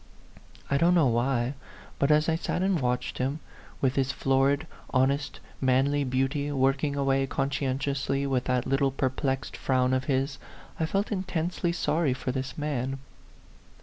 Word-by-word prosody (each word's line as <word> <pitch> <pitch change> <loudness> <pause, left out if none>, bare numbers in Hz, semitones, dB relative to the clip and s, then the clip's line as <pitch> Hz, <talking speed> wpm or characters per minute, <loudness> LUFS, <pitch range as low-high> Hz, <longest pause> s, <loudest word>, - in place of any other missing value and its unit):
I 140 - +1
don't 175 +3 +4
know 165 -4 +5
why, 120 +2 +1 0.5
but 140 - +2
as 150 +1 +4
I 160 - +2
sat 175 +2 -2
and 190 -3 +2
watched 125 0 -1
him, 135 +4 -1 0.4
with 135 0 +1
his 135 0 +2
florid, 135 +2 +2 0.3
honest, 135 +2 +1 0.2
manly 135 +2 +2
beauty, 135 +3 0
working 135 +1 +1
away 135 -1 +1
conscientiously, 135 0 -1
with 130 -2 0
that 125 -1 0
little 135 +1 +2
perplexed 135 0 -2
frown 130 -1 +1
of 130 0 0
his, 135 -2 0 0.4
I 160 - +1
felt 195 +6 -1
intensely 180 -3 -1
sorry 160 -5 +1
for 130 - -3
this 130 0 -4
man. 135 -3 -2
135 Hz, 150 wpm, -27 LUFS, 130-145 Hz, 0.5 s, know